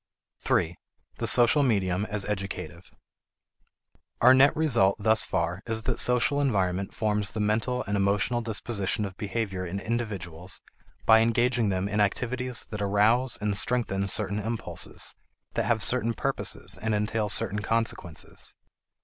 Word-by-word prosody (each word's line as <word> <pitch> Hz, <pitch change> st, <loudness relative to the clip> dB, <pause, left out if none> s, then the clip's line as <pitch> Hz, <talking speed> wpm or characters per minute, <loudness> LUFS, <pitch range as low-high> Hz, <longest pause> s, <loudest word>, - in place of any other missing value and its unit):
3. 85 Hz, +2 st, 0 dB, 0.4 s
The -, -, 0 dB
Social 120 Hz, +4 st, +6 dB
Medium 100 Hz, -6 st, +1 dB
as 105 Hz, -2 st, -1 dB
Educative. 100 Hz, -2 st, -5 dB, 1.3 s
Our 125 Hz, +2 st, +7 dB
net 135 Hz, +2 st, +5 dB
result 120 Hz, -11 st, +3 dB
thus 110 Hz, +1 st, +2 dB
far 90 Hz, +1 st, -2 dB
is 110 Hz, -1 st, -2 dB
that 120 Hz, 0 st, -2 dB
social 125 Hz, +3 st, +4 dB
environment 95 Hz, -7 st, 0 dB
forms 105 Hz, -3 st, 0 dB
the 110 Hz, -, -4 dB
mental 110 Hz, +4 st, 0 dB
and 100 Hz, -, -3 dB
emotional 100 Hz, +5 st, +1 dB
disposition 110 Hz, -2 st, -1 dB
of 95 Hz, -2 st, -7 dB
behavior 100 Hz, -3 st, -3 dB
in 90 Hz, +2 st, -4 dB
individuals 95 Hz, -7 st, -4 dB, 0.5 s
by 110 Hz, 0 st, +7 dB
engaging 115 Hz, 0 st, +2 dB
them 95 Hz, 0 st, -1 dB
in 105 Hz, +1 st, -2 dB
activities 125 Hz, +4 st, -1 dB
that 105 Hz, -1 st, -5 dB
arouse 110 Hz, +5 st, +2 dB
and 105 Hz, -1 st, 0 dB
strengthen 100 Hz, -4 st, +1 dB
certain 100 Hz, +2 st, 0 dB
impulses, 115 Hz, +2 st, -4 dB, 0.4 s
that -, -, -1 dB
have 110 Hz, -2 st, +1 dB
certain 115 Hz, -2 st, +3 dB
purposes -, -, -2 dB
and 110 Hz, 0 st, 0 dB
entail 105 Hz, 0 st, -1 dB
certain 105 Hz, +1 st, +1 dB
consequences. 110 Hz, -7 st, -3 dB
105 Hz, 140 wpm, -27 LUFS, 100-120 Hz, 1.3 s, Our